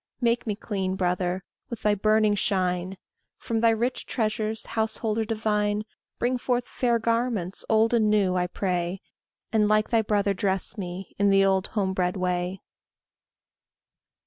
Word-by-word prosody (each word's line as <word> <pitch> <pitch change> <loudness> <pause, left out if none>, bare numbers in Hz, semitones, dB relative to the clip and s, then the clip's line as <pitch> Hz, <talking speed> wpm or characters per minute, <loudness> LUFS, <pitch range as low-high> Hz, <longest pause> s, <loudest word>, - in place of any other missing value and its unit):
Make 235 -1 +1
me 210 - 0
clean, 190 -3 -2
brother, 180 0 -1 0.3
with 235 -2 -7
thy 210 - +4
burning 215 +1 +3
shine; 185 -2 -1 0.4
From 225 -1 -2
thy 230 - +5
rich 235 +3 -1
treasures, 220 -1 -1
householder 220 0 -1
divine, 210 -1 0 0.3
Bring 245 +1 0
forth 245 0 0
fair 240 -2 +1
garments, 230 -5 -1
old 220 +1 +3
and 220 -3 +3
new, 200 -3 +3
I 180 0 +1
pray, 180 0 -2 0.5
And 215 -1 +4
like 215 0 +2
thy 230 -1 +4
brother 205 -2 +1
dress 190 0 -1
me, 185 -1 -6
in 200 0 +4
the 195 0 +5
old 190 0 +2
home 195 -3 -1
bred 180 0 0
way. 180 0 -2
210 Hz, 145 wpm, -26 LUFS, 190-225 Hz, 0.5 s, thy